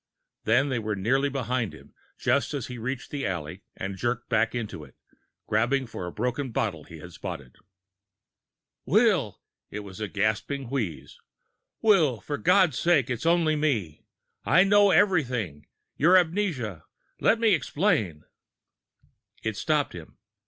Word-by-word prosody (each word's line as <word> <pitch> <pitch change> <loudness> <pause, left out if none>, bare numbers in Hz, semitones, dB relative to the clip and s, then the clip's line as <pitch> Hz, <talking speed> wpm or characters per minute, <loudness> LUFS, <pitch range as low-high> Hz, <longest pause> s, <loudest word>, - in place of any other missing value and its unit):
Then 125 +6 +3
they 130 -3 -1
were 110 -1 -2
nearly 130 +8 +1
behind 125 - -2
him, - - -17 0.2
just - - +1
as - - -3
he 125 -1 -7
reached 125 0 -4
the 145 -2 -3
alley 90 0 -4 0.2
and 95 0 -5
jerked 120 -1 -2
back 115 0 +1
into 115 -3 -5
it, - - -16 0.5
grabbing 120 +5 +1
for 100 -6 -6
a - - -5
broken 125 +6 -2
bottle 95 -9 -2
he 85 - -11
had 85 +2 -11
spotted. 65 -5 -7 1.3
"Will!" 185 - +2 0.3
It 105 - -6
was 100 -1 -10
a 110 - -2
gasping 110 +6 -2
wheeze. 85 - -4 0.6
"Will! 165 - +4
For 145 +8 -5
God's 180 -5 +3
sake, 145 -7 +2
it's 125 +6 -2
only 165 -2 +3
me. 115 - -1 0.4
I 180 - +5
know 205 +1 +5
everything 125 - +1 0.3
your 175 +6 +6
amnesia. 160 - -1 0.4
But - - -7
let 225 - +4
me 225 -3 +4
explain!" 125 - 0 1.2
It 110 -1 -2
stopped 150 +6 0
him. 85 -3 -11
125 Hz, 145 wpm, -26 LUFS, 105-155 Hz, 1.3 s, your